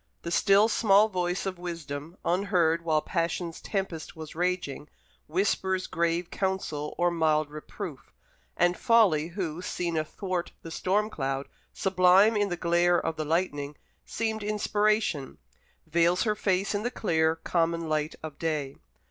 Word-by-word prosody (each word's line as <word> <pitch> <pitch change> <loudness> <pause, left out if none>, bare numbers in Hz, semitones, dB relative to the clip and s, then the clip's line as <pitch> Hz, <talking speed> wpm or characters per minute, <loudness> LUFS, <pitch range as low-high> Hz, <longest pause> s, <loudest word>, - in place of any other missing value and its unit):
The 170 - -4
still 200 +4 +5
small 215 -1 +4
voice 180 -1 -1
of 185 -2 -4
Wisdom, 165 -2 -6
unheard 175 -3 +2
while 155 -2 +1
Passion's 170 -1 -2
tempest 190 -6 -4
was 160 -1 -8
raging, 175 -4 -2 0.4
whispers 190 +2 0
grave 170 +1 -1
counsel 190 -6 -2
or 175 0 +2
mild 155 -3 +1
reproof; 150 0 -8 0.5
and 175 +1 +3
Folly, 200 -11 +4
who, 175 -2 -4
seen 175 -2 -3
athwart 175 +3 -3
the 165 - -8
storm 210 +6 0
cloud, 135 -3 -2 0.2
sublime 190 +3 +4
in 205 -1 +1
the 175 - -3
glare 175 +1 +3
of 165 - -2
the 155 - -3
lightning, 150 -3 -1 0.3
seemed 220 -1 -2
inspiration, 210 -7 0 0.5
veils 170 +2 +2
her 215 -2 +1
face 195 0 0
in 205 - -1
the 240 - -1
clear, 160 -9 +1
common 165 0 0
light 155 0 -1
of 155 -3 -7
day. 150 -4 -2
175 Hz, 140 wpm, -28 LUFS, 160-190 Hz, 0.5 s, still